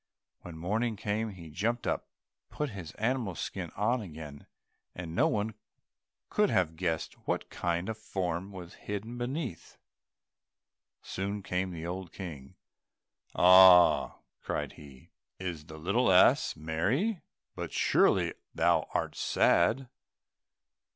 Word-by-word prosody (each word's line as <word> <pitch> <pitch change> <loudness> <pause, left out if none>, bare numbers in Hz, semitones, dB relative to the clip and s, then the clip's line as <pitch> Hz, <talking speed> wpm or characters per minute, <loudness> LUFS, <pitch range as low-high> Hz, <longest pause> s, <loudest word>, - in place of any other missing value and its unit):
When 85 -2 -9
morning 110 +7 -1
came, 105 +2 -2
he 85 -6 -10
jumped 115 +8 -1
up, - - -1 0.4
put 150 -3 -3
his 90 -7 -7
animal's 110 -5 -1
skin - - -4
on 115 +5 +1
again, 80 -6 -9 0.5
and 85 -2 -6
no 140 - +3
one 110 -6 -1 0.8
could 210 -1 +3
have 80 -4 +1
guessed 80 -1 -2
what - - -2
kind 85 +1 -1
of 110 - -3
a - - -25
form 95 -2 -3
was 90 -3 -9 0.2
hidden 110 +4 -4
beneath 125 - -4
it. - - -33
Soon 100 +1 -3
came 95 +1 -1
the 85 -2 -6
old 90 +1 -5
King, 75 -8 -8 0.8
"Ah," 90 -1 +7 0.2
cried - - -3
he, 70 -4 -15 0.3
"is 85 -5 -5
the 80 -1 -10
little 100 +8 +2
ass 90 - +5
merry? 110 - -1 0.3
But - - -5
surely - - +3 0.2
thou - - +2
art - - -1
sad?" 115 +10 +2
95 Hz, 130 wpm, -30 LUFS, 85-110 Hz, 0.8 s, Ah